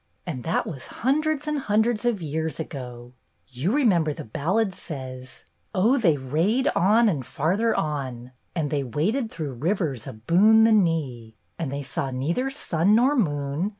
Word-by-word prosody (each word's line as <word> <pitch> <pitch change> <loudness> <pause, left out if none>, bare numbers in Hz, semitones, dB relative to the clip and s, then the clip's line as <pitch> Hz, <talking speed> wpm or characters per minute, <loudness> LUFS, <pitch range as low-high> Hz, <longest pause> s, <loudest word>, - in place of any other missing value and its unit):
And 140 -9 -5
that 165 - 0
was 135 -6 -7 0.2
hun 275 +4 +3
dreds 310 -1 -2
and 300 -1 0
hundreds 220 0 +1
of 220 -7 0
years 160 +2 -3
ago! 125 -5 -7 0.3
You 130 +9 -2
re 290 +3 +2
member 170 - +3
the - - -8
ballad 190 - 0
says: 130 -6 -7
— - - -19
O 230 +9 +3
they 165 -10 +3
rade 165 - 0
on 215 +6 +4
and 150 -10 0
farther 175 - 0
on, 130 -5 -3 0.2
And 155 -4 -1
they 145 -2 0
waded 205 - -1
through 155 - -5
rivers 150 - -2
aboon 190 - +4
the 225 - +5
knee. 150 - 0 0.2
And 155 -5 -3
they 140 0 -4
saw 135 0 -3
neither 155 - -1
sun 200 - +1
nor 255 +6 +4
moon. 145 - 0
165 Hz, 170 wpm, -25 LUFS, 135-220 Hz, 0.3 s, the